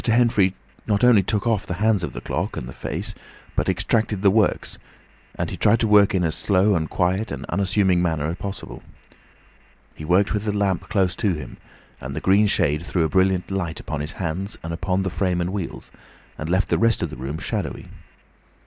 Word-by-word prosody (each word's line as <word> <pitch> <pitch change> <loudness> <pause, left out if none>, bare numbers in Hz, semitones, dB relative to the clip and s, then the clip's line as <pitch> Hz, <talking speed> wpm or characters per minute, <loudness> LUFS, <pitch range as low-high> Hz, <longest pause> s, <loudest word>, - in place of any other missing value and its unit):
Henfrey 115 -5 +3 0.3
not 100 +1 +1
only 120 -5 +7
took 100 +3 -1
off 110 -4 0
the 90 - -3
hands 105 0 +2
of 85 - -3
the - - -7
clock, - - -3
and - - -5
the 65 - -8
face, - - -4 0.4
but - - 0
extracted 110 -3 0
the 100 - +6
works; 105 0 +1 0.6
and - - -3
he - - -5
tried 110 +2 +4
to 115 - +2
work 105 -2 +5
in 90 - +2
as 80 -2 0
slow 100 +3 +2
and 80 -3 0
quiet 95 +4 0
and 70 0 -5
unassuming 95 -1 +2
a - - +1
manner 80 -4 0
as 85 +2 -3
possible. 100 0 -7 1.1
He - - -10
worked 90 +7 +2
with 105 0 -2
the 105 -1 -1
lamp 95 -2 0
close 95 -3 +1
to 100 -6 +1
him, 75 - -8 0.4
and 65 +1 -6
the - - -2
green 100 +5 +4
shade 75 -4 +1
threw 85 0 0
a 80 - +1
brilliant 95 +1 +1
light 85 -4 -2
upon 80 -3 -4
his 75 +2 -4
hands, 95 +4 -4
and 85 0 -4
upon 95 +3 -1
the 95 - -2
frame 90 -1 0
and 90 +2 -2
wheels, 95 -5 -5 0.4
and 75 - -5
left 95 +3 +1
the - - +2
rest 115 -1 +3
of - - -3
the - - -7
room 65 +5 -5
shadowy. - - -4
95 Hz, 210 wpm, -23 LUFS, 85-105 Hz, 1.1 s, only